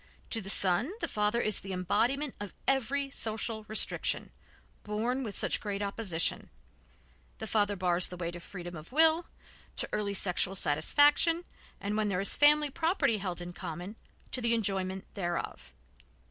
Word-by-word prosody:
To 225 - +1
the 195 - -7
son 195 - +2
the - - -1
father 210 +2 +1
is 215 -3 +2
the 195 -1 -6
embodiment 240 - +1
of 205 -2 -6
every 275 +1 +1
social 220 -2 -2
restriction, 215 - +1 0.5
borne 230 +5 -1
with 215 -6 -4
such - - +2
great 205 -1 -3
opposition; 200 -5 -2 0.9
the - - -5
father 205 -2 +1
bars 180 -1 +3
the 180 - -8
way 170 -1 -3
to 175 - -7
freedom 175 0 -8
of 155 +4 -10
will, 320 +3 +4 0.5
to - - -2
early 200 -1 -1
sexual 190 0 0
satisfaction, 290 - +3 0.3
and 205 +1 -2
where 215 -1 +1
there 185 -3 0
is 200 - +2
family 295 0 +5
property 320 - +1
held 180 -3 -3
in 175 0 -6
common, 175 +5 -6 0.4
to 255 - -3
the 235 0 +3
enjoyment 190 -3 -1
thereof. 175 -4 -4
210 Hz, 160 wpm, -31 LUFS, 185-245 Hz, 0.9 s, family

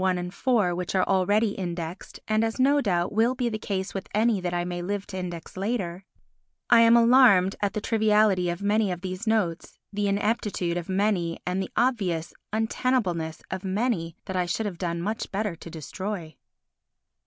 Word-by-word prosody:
I 190 - +3
and 180 -1 -3
IV 200 -3 +1
which 180 +1 -3
are 185 - +4
already 205 +3 +2
indexed 175 -3 -5
and 215 0 +2
as, 225 +2 -2
no 285 +2 +4
doubt, 175 -6 0
will 230 +4 +2
be 245 -2 0
the 215 -1 -4
case 190 -2 -3
with 195 - -5
any 220 -2 +2
that 180 -1 -2
I 175 0 -1
may 175 0 -4
live 200 +2 -3
to 190 - -6
index 175 -2 -6
later, 190 -3 -3 0.7
I 235 - +8
am 230 +1 +7
alarmed 230 -6 +6
at 205 -1 0
the 215 - -2
triviality 210 -5 +3
of 175 +3 -4
many 205 -1 +2
of 175 -1 -5
these 185 +3 -5
notes, 200 -7 0 0.2
the 205 0 0
ineptitude 200 -3 0
of 175 0 -4
many 190 -4 0
and 180 +1 -1
the 190 - -4
obvious 200 -9 0 0.2
untenableness 215 -7 -1
of 190 0 -4
many 190 -4 -1
that 190 - -5
I 180 -1 0
should 195 +6 -1
have 185 -5 -5
done 170 -2 -2
much 215 +3 -3
better 205 -2 -2
to 170 - -10
destroy. 165 +2 -6
195 Hz, 190 wpm, -26 LUFS, 175-220 Hz, 0.7 s, I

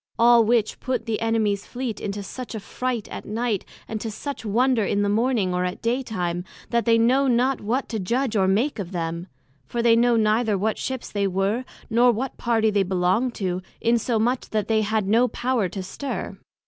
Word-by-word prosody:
All 235 0 +6
which 225 -1 +1
put 260 0 -2
the 225 -1 -2
Enemies 220 -3 0
Fleet 245 -3 -4
into 200 0 -4
such 250 +3 -7
a - - -3
fright 245 +1 -3
at - - -6
night, 220 -2 -1 0.2
and 220 -1 -4
to 225 - -3
such 280 +6 -6
wonder 235 +2 +2
in 205 0 +1
the 205 - +1
morning, 220 -3 +1
or 180 0 0
at 180 0 -3
day 240 +3 +1
time, 180 -7 -3 0.3
that 235 -1 +1
they 230 -1 +5
know 255 +4 +3
not 250 +1 +2
what 245 +6 -1
to 225 - -2
judg 235 +5 -1
or 190 -2 +3
make 225 +8 +1
of 190 -1 -5
them; 170 +1 -3 0.4
for 235 - -2
they 230 -1 +6
know 240 +1 +4
neither 215 -1 +2
what 215 +3 -1
Ships 260 -2 -4
they 200 -1 0
were, 195 +6 0 0.2
nor 240 +2 +4
what 245 +4 -3
Party 225 -2 +2
they 205 -1 +2
belonged 190 +6 +1
to, 185 -2 -2 0.2
insomuch 235 +1 +1
that 215 -1 -1
they 220 -1 +2
had 215 -1 0
no 230 +5 +4
power 240 -4 0
to 190 +2 -5
stir. 265 +9 -5
225 Hz, 200 wpm, -24 LUFS, 200-245 Hz, 0.4 s, All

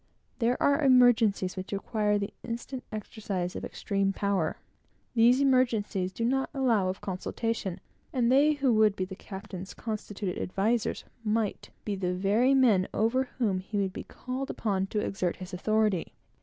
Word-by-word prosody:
There 245 +1 +2
are 285 +2 +3
emergencies 245 -8 +4
which 185 0 -6
require 210 +1 0
the 200 0 -3
instant 240 +2 -5
exercise 200 -4 -4
of - - -5
extreme 195 -1 -1
power. 195 -5 0 0.6
These 240 +2 +5
emergencies 230 -8 +2
do 230 +4 -2
not 270 +2 +1
allow 230 -8 +2
of 190 - -4
consultation; 195 0 -3 0.3
and 245 -2 +2
they 290 +3 +5
who 275 -4 +2
would 215 -2 +4
be 185 - -2
the 190 +1 -8
captain's 190 -1 -8
constituted 205 -3 -4
advisers 220 +5 0 0.2
might 215 -1 -1 0.2
be 210 - -1
the 180 -2 -1
very 215 +8 +3
men 220 -8 +4
over 240 +5 +2
whom 210 -7 +1
he 200 +3 -5
would 195 -2 0
be - - -6
called 260 +2 -5
upon 195 -3 -1
to 210 +1 -1
exert 185 -3 -1
his 185 0 -9
authority. 210 -1 +1
210 Hz, 155 wpm, -29 LUFS, 190-240 Hz, 0.6 s, These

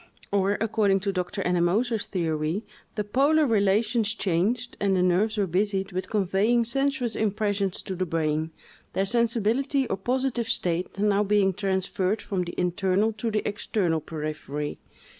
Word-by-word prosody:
Or, 200 0 +2
according 205 -3 +2
to 200 +1 0
Dr. 185 +2 -2
Ennemoser's 195 +6 +1
theory, 165 +2 -1 0.3
the 210 - -1
polar 285 +9 +3
relations 215 0 +2
changed, 215 +7 0
and 195 -2 +2
the 180 - +2
nerves 200 +5 +2
were 205 - +2
busied 195 +2 0
with 185 +1 -4
conveying 210 +3 +2
sensuous 265 -1 0
impressions 205 -2 -1
to 190 - -4
the 185 0 -2
brain, 160 -1 0 0.4
their 195 - +1
sensibility 235 +5 +1
or 195 - -2
positive 245 +2 -1
state 180 -3 -1
now 205 0 +2
being 200 -2 +3
transferred 190 +1 -1
from 185 -3 -2
the 175 - -6
internal 190 +4 +1
to 220 +2 -3
the 215 -1 -1
external 190 -5 -1
periphery. 150 -1 -5
200 Hz, 145 wpm, -26 LUFS, 185-225 Hz, 0.4 s, polar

